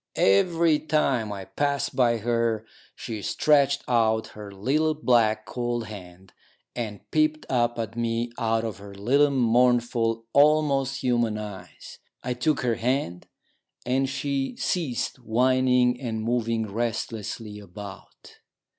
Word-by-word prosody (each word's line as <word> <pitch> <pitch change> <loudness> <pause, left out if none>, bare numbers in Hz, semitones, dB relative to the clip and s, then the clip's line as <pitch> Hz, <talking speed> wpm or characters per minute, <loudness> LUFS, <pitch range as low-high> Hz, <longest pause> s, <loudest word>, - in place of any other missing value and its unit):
Every 165 - +3
time 140 -8 0
I 100 -2 -6
passed 140 +4 -1
by 120 -2 +3
her 115 -1 0 0.3
she 110 -3 -6
stretched 140 +3 +2
out 110 -2 +2
her 105 -1 -10
little, 145 +11 0
black, 115 -7 +2
cold 120 -1 -3
hand, 95 -3 -11 0.4
and 110 -4 -4
peeped 155 0 +1
up 120 -2 +1
at 115 -1 -4
me 115 0 -1
out 115 0 +1
of 110 -3 -4
her 100 0 -11
little 135 +9 +3
mournful, 120 -2 +2
almost 140 -2 +3
human 120 -4 +1
eyes. 100 -4 -9 0.2
I 125 - -1
took 125 +5 0
her 120 -2 0
hand, 120 -8 -2 0.6
and 130 +2 +1
she 140 - -2
ceased 165 - -2
whining 125 +1 +2
and 110 -3 -3
moving 115 -1 0
restlessly 110 -2 -4
about. 100 0 -12
120 Hz, 125 wpm, -25 LUFS, 110-135 Hz, 0.6 s, Every